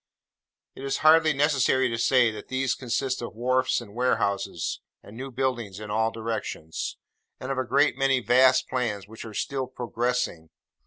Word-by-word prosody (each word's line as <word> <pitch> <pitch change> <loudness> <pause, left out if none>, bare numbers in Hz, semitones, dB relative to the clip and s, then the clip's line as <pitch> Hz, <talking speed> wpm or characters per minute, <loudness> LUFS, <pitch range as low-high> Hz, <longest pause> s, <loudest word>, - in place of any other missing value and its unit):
It 135 - -10
is 135 - -1
hardly 160 0 +7
necessary 135 -3 +2
to 115 -1 -2
say, 120 0 +4
that 110 - -9
these 130 -1 0
consist 130 +1 -2
of 120 -2 -6
wharfs 130 +2 +1
and 105 -4 -12
warehouses, 115 -5 -1 0.2
and 105 - -13
new 135 +3 -6
buildings 120 -6 -2
in 105 -1 -7
all 110 +1 +2
directions; 110 -8 -4 0.4
and 130 - -4
of 135 - -1
a - - +1
great 135 +1 +2
many 135 -1 +3
vast 130 +2 +4
plans 110 -6 -2
which 110 +2 -10
are 110 -2 -9
still 135 +3 -2
'progressing. 120 -9 -2
125 Hz, 165 wpm, -26 LUFS, 110-130 Hz, 0.4 s, hardly